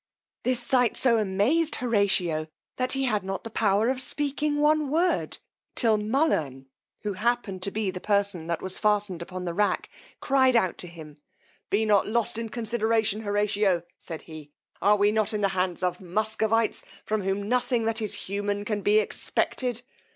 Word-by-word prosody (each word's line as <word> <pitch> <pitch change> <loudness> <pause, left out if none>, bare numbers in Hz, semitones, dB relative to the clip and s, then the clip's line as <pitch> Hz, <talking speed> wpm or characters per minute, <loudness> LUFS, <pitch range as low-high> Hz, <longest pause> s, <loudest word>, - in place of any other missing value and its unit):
This 250 -1 0
sight 245 -1 +2
so 235 -3 +4
amazed 215 +12 +2
Horatio, 195 -9 +1 0.3
that 255 0 +1
he 270 0 0
had 215 -6 0
not 195 0 -4
the 225 - -7
power 210 0 +2
of 260 0 0
speaking 290 +2 -1
one 300 0 +3
word; 340 +5 +1 0.4
till 225 -3 +3
Mullern, 210 - 0 0.4
who 210 -1 -2
happened 215 -2 -1
to 200 - +2
be 205 -1 -2
the 180 -1 -7
person 200 -5 0
that 170 -1 -2
was 190 0 -3
fastened 205 -4 +1
upon 180 +1 -6
the 175 -1 -3
rack, 205 +3 0 0.3
cried 260 -2 +3
out 190 -6 +2
to 180 - -2
him, 160 -3 -11 0.5
Be 215 +2 +2
not 205 -2 +3
lost 225 0 0
in 230 -1 -4
consideration, 225 -2 0
Horatio, 205 -3 +1 0.2
said 160 -3 -7
he; 155 -2 -10 0.3
are 205 +3 +5
we 205 0 +3
not 215 0 0
in 210 - -1
the 200 - +3
hands 185 -1 -1
of 180 +1 -1
Muscovites, 220 +4 0 0.2
from 215 -1 -1
whom 195 +1 -2
nothing 245 -1 +1
that 225 0 -1
is 215 - -1
human 205 +1 -2
can 210 -1 -2
be 205 +2 +4
expected? 245 +2 -1
210 Hz, 175 wpm, -26 LUFS, 195-235 Hz, 0.5 s, are